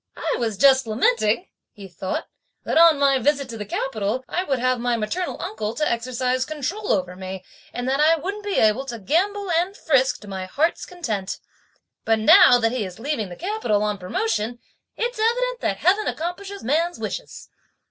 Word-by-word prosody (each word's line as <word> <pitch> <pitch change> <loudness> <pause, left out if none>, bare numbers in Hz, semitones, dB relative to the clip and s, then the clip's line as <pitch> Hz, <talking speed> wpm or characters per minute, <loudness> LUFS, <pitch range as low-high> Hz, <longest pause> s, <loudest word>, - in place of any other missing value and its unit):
"I - - -1
was 225 -4 -2
just 265 +1 +5
lamenting," 230 - +1 0.3
he 200 -3 -11
thought, 185 +1 -4 0.4
"that - - -2
on 335 -3 +7
my 275 -1 +3
visit 280 +1 +1
to 230 - -6
the 210 - -5
capital, 225 +1 -2
I 360 - -1
would 275 -7 0
have 255 0 +1
my 240 0 0
maternal 335 +12 -3
uncle 215 0 -4
to 305 - 0
exercise 255 +2 -1
control 310 +9 -3
over 180 -2 0
me, 190 0 -7 0.3
and 245 +1 -4
that 270 +2 +1
I 315 +2 +5
wouldn't 395 +6 -5
be 405 -1 -2
able 220 +4 +3
to 240 -3 -5
gambol 370 - 0
and 355 +5 0
frisk 265 -4 +2
to 210 - -12
my 190 -1 -5
heart's 300 - -1
content, 225 - -4 0.7
but 225 0 +2
now 220 +3 +7
that 225 -1 +1
he 250 -3 -1
is 185 -2 -7
leaving 235 -5 -3
the 175 - -8
capital, 360 - -1
on 210 -1 -1
promotion, 220 +5 -2 0.4
it's 480 0 -2
evident - - +1
that - - -1
Heaven 405 +4 +2
accomplishes 385 +5 -5
man's 330 +7 0
wishes." - - -6
255 Hz, 185 wpm, -23 LUFS, 215-345 Hz, 0.7 s, on